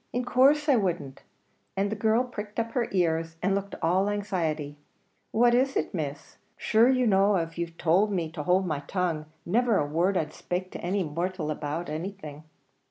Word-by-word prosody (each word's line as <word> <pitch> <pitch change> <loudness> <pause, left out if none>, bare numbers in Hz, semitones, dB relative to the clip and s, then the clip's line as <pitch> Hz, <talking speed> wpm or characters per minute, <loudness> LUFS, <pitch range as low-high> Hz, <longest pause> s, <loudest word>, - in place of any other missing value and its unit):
in 245 0 -2
course 275 +5 +4
I 275 -4 +5
wouldn't," 175 -9 -2 0.6
and 200 +1 0
the - - -1
girl 220 +3 +2
pricked 210 -4 -6
up 230 0 -2
her 235 -1 0
ears, 165 -3 0
and 195 +1 +2
looked 200 0 -3
all 185 +5 +2
anxiety. 165 -8 -2 0.5
"What 240 +2 +4
is 265 +2 +2
it, - - -1
Miss? 150 -3 -5 0.2
Shure 225 +3 +4
you 255 -1 +3
know 200 -1 +4
av 165 -1 -3
you 170 0 -2
tould 170 +5 +1
me 170 -5 -2
to 160 -2 -5
hould 180 +5 +2
my 155 -5 -1
tongue, 160 0 -2 0.2
never 230 +3 +2
a 145 - +1
word 170 +6 +1
I'd 155 - -2
spake 180 +1 -4
to - - -7
any 190 +3 0
mortial 170 +1 -3
about 150 +3 -4
anything." 155 -2 -6
185 Hz, 185 wpm, -27 LUFS, 160-215 Hz, 0.6 s, I